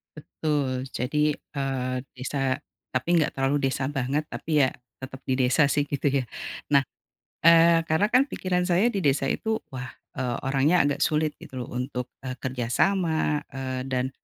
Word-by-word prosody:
Betul, 145 Hz, -4 st, -2 dB
jadi, 150 Hz, +4 st, +1 dB, 0.2 s
eee, 135 Hz, -2 st, -1 dB, 0.2 s
desa 135 Hz, +1 st, -1 dB, 0.3 s
tapi 130 Hz, +7 st, +1 dB
enggak 155 Hz, -2 st, +3 dB
terlalu 135 Hz, +2 st, +1 dB
desa 130 Hz, +1 st, -1 dB
banget, 145 Hz, +2 st, -1 dB
tapi 155 Hz, -2 st, -1 dB
ya -, -, -1 dB, 0.3 s
tetap 130 Hz, 0 st, -9 dB
di 130 Hz, -, 0 dB
desa 130 Hz, +4 st, +4 dB
sih 145 Hz, 0 st, +1 dB
gitu 145 Hz, 0 st, -1 dB
ya. 135 Hz, -1 st, +1 dB, 0.4 s
Nah, 140 Hz, -2 st, +4 dB, 0.6 s
eee, 165 Hz, 0 st, +7 dB
karena 165 Hz, +6 st, +2 dB
kan 255 Hz, +3 st, +5 dB
pikiran 180 Hz, -9 st, -1 dB
saya 185 Hz, +6 st, +3 dB
di 235 Hz, -, -3 dB
desa 135 Hz, -1 st, +2 dB
itu 220 Hz, 0 st, -1 dB
wah, 130 Hz, -1 st, -7 dB, 0.2 s
eee, 125 Hz, -2 st, -1 dB
orangnya 140 Hz, +6 st, +3 dB
agak 145 Hz, 0 st, 0 dB
sulit 155 Hz, 0 st, 0 dB
gitu 130 Hz, -1 st, -8 dB
loh 120 Hz, -, -7 dB
untuk, 125 Hz, -1 st, -3 dB, 0.2 s
eee, 130 Hz, -, -3 dB
kerja 125 Hz, -2 st, -2 dB
sama, 160 Hz, -5 st, +1 dB
eee, 130 Hz, -1 st, -3 dB
dan 130 Hz, -1 st, -1 dB
140 Hz, 165 wpm, -26 LUFS, 130-160 Hz, 0.6 s, eee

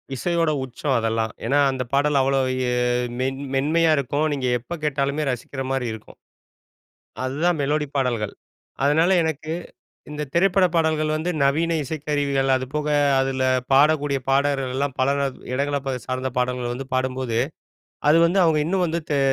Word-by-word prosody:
இசையோட 165 Hz, +2 st, 0 dB
உச்சம் 130 Hz, +2 st, -2 dB
அதெல்லாம். 110 Hz, -1 st, -1 dB
ஏன்னா, 145 Hz, +1 st, +2 dB
அந்த 130 Hz, -1 st, -3 dB
பாடல் 140 Hz, 0 st, +3 dB
அவ்வளா 135 Hz, 0 st, +2 dB, 0.3 s
ஏ -, -, 0 dB, 0.5 s
மென் 135 Hz, +1 st, -1 dB, 0.2 s
மென்மையா 160 Hz, +4 st, +3 dB
இருக்கும். 140 Hz, +2 st, -1 dB
இப்போ 155 Hz, -, +1 dB
நீங்க 130 Hz, -2 st, -2 dB
எப்ப 150 Hz, +9 st, -8 dB
கேட்டாலுமே 140 Hz, +1 st, 0 dB
ரசிக்கிற 135 Hz, +2 st, -5 dB
மாரி 135 Hz, -2 st, -1 dB
இருக்கும். 110 Hz, -, -12 dB, 1.1 s
அதுதான் 155 Hz, +6 st, 0 dB
மெலோடி 150 Hz, +1 st, 0 dB
பாடல்கள். 120 Hz, -6 st, -1 dB, 0.5 s
அதனால, 160 Hz, +5 st, +3 dB
எனக்கு 160 Hz, 0 st, -3 dB, 0.6 s
இந்த 150 Hz, 0 st, -4 dB
திரைப்பட 190 Hz, +2 st, +4 dB
பாடல்கள் 155 Hz, -2 st, +1 dB
வந்து 160 Hz, +3 st, -1 dB
நவீன 160 Hz, +4 st, +2 dB
இசைக்கருவிகள், 145 Hz, -2 st, -1 dB
அதுபோக 145 Hz, +4 st, -3 dB, 0.3 s
அதில 135 Hz, 0 st, -1 dB, 0.3 s
பாடக்கூடிய 145 Hz, 0 st, +4 dB
பாடகர்கள்லாம் 135 Hz, -1 st, 0 dB
பல 135 Hz, +2 st, +3 dB, 0.4 s
இடங்கள 140 Hz, +2 st, 0 dB, 0.3 s
சார்ந்த 130 Hz, 0 st, -2 dB
பாடல்கள் 125 Hz, -1 st, -1 dB
வந்து 130 Hz, +2 st, -6 dB
பாடும்போது, 130 Hz, -2 st, -1 dB, 0.7 s
அது 165 Hz, -, +6 dB
வந்து 190 Hz, +3 st, +2 dB
அவங்க 160 Hz, -2 st, +3 dB
இன்னும் 185 Hz, +1 st, +1 dB
வந்து 165 Hz, +1 st, -2 dB
தெ 145 Hz, -, +2 dB
140 Hz, 140 wpm, -23 LUFS, 130-155 Hz, 1.1 s, அது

